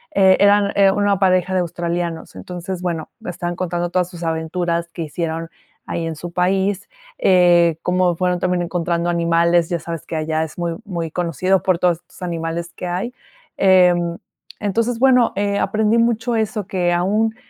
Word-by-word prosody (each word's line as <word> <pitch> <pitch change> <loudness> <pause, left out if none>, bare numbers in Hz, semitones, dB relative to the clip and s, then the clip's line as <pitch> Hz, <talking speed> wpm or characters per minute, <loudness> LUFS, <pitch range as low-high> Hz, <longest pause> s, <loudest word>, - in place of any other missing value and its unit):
Eh, 190 -1 +5
eran, 205 0 +4
eh, 195 -1 +5
una 200 -1 +1
pareja 185 -1 +2
de 185 - +2
australianos. 170 -1 -4
Entonces, 180 0 -6
bueno, 170 -3 -3 0.2
estaban 175 0 -4
contando 175 -1 -2
todas 180 -1 0
sus 175 -2 -9
aventuras 170 +1 -1
que 165 - -4
hicieron 165 +1 -4 0.4
ahí 165 -1 -3
en 160 - -4
su 170 +3 -7
país. 190 - 0 0.3
Eh, 175 -3 +4
cómo 180 -1 +2
fueron 180 0 0
también 180 -1 0
encontrando 170 0 -1
animales, 170 0 +2
ya 170 - -1
sabes 165 -1 -6
que 165 - -5
allá 155 0 -1
es 160 - -8
muy 170 -1 -2
muy 170 -5 -4
conocido 180 +2 0
por 185 -3 +2
todos 175 -2 +2
estos - - -20
animales 170 0 -4
que 180 - -5
hay. 185 +8 -3 0.4
Em, 180 -3 +4 0.4
entonces, 225 +4 0
bueno, 250 -3 +4
eh, 200 0 0
aprendí 215 +1 +1
mucho 230 0 +1
eso, 215 -2 -1
que 180 -2 0
aún 210 +5 +1
175 Hz, 170 wpm, -20 LUFS, 170-190 Hz, 0.4 s, Eh